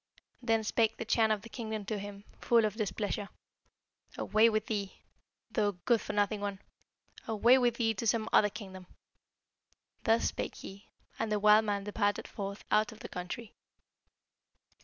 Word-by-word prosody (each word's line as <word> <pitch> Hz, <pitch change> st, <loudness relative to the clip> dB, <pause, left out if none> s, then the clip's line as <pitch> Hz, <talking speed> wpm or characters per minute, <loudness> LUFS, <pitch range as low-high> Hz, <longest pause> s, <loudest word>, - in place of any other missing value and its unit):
Then 225 Hz, -2 st, +1 dB
spake 220 Hz, +1 st, +1 dB
the 230 Hz, -, -4 dB
Chan 225 Hz, -1 st, +3 dB
of 215 Hz, -2 st, 0 dB
the 230 Hz, -, -10 dB
kingdom 220 Hz, -3 st, -5 dB
to 215 Hz, 0 st, -3 dB
him, 200 Hz, 0 st, -8 dB, 0.2 s
full 230 Hz, -2 st, +4 dB
of 210 Hz, -, -1 dB
displeasure, 205 Hz, -1 st, -3 dB, 0.9 s
'Away 220 Hz, +2 st, +4 dB
with 215 Hz, -1 st, 0 dB
thee, 200 Hz, -3 st, -3 dB, 0.6 s
thou 205 Hz, -2 st, +1 dB
good 235 Hz, -3 st, +3 dB
for -, -, -5 dB
nothing 205 Hz, 0 st, +1 dB
one! 200 Hz, -1 st, -3 dB, 0.7 s
Away 235 Hz, +4 st, +5 dB
with 240 Hz, -2 st, +2 dB
thee 225 Hz, -2 st, +1 dB
to 225 Hz, +3 st, -3 dB
some 220 Hz, 0 st, +1 dB
other 210 Hz, -, +6 dB
kingdom!' 190 Hz, -3 st, -9 dB, 1.2 s
Thus 225 Hz, +1 st, +3 dB
spake -, -, -3 dB
he, 195 Hz, +1 st, -11 dB, 0.3 s
and 225 Hz, -1 st, -1 dB
the 210 Hz, -, +2 dB
wild 210 Hz, +1 st, +6 dB
man 200 Hz, -1 st, -1 dB
departed 205 Hz, 0 st, -1 dB
forth 200 Hz, 0 st, -6 dB
out 215 Hz, 0 st, +3 dB
of 220 Hz, -, -13 dB
the -, -, -7 dB
country. 180 Hz, +5 st, -6 dB
215 Hz, 160 wpm, -31 LUFS, 205-225 Hz, 1.2 s, other